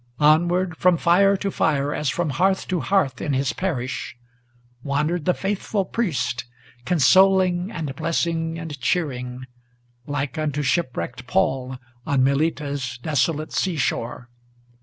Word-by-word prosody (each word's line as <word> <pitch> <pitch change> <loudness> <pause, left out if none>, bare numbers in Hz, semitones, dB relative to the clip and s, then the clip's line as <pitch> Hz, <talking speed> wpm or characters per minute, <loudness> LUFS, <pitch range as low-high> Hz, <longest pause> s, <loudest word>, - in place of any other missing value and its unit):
Onward 175 +4 +3
from 180 -2 +4
fire 195 +4 +4
to 195 +1 -2
fire, 145 -4 +1
as 150 - -1
from 165 +1 -1
hearth 190 +6 +1
to 180 - 0
hearth 160 -2 +1
in 145 - -1
his 135 0 0
parish, 130 -7 -3 0.6
Wandered 150 +4 -1
the 180 - +2
faithful 195 0 -2
priest, 155 - -2 0.4
consoling 185 +3 +4
and 155 -9 -4
blessing 165 +1 -1
and 160 -4 -7
cheering, 125 -3 -2 0.6
Like 145 +2 -3
unto 150 -1 -1
shipwrecked 130 -4 -2
Paul 130 0 0 0.3
on 135 -1 +1
Melita's 140 -2 0
desolate 150 +3 -1
sea 185 -3 0
shore. 120 -2 -2
155 Hz, 125 wpm, -23 LUFS, 135-180 Hz, 0.6 s, from